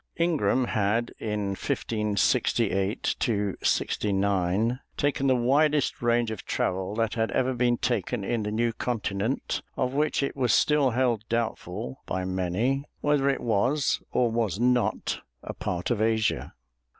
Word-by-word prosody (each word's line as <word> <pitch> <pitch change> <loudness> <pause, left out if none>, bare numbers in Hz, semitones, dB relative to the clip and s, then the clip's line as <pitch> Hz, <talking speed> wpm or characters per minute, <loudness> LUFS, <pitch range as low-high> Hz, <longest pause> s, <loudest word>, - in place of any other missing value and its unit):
Ingram 160 -6 +2
had 110 +2 0
in 105 -2 -2
1568 100 -1 0 0.5
69 100 +3 +1 0.2
taken 140 -1 +1
the 130 - +4
widest 145 +4 +2
range 120 -1 +2
of 110 - -6
travel 95 +2 -1
that 115 -1 0
had 115 -1 0
ever 130 0 +1
been 120 -1 +2
taken 120 -3 -1
in 115 +3 -1
the 105 - -2
new 115 +2 0
continent, 110 0 -2 0.2
of 130 0 0
which 150 0 +1
it 140 - -2
was 125 -4 +2
still 150 -3 +3
held 120 -3 +1
doubtful 115 0 -3
by 95 0 -2
many 95 +9 0 0.2
whether 145 -2 +2
it 135 - 0
was 125 +6 +1
or 120 -2 +2
was 110 -4 -1
not 125 0 +1 0.2
a - - -5
part 90 +6 -3
of 110 -3 0
Asia. 110 -1 0
115 Hz, 140 wpm, -27 LUFS, 105-130 Hz, 0.5 s, the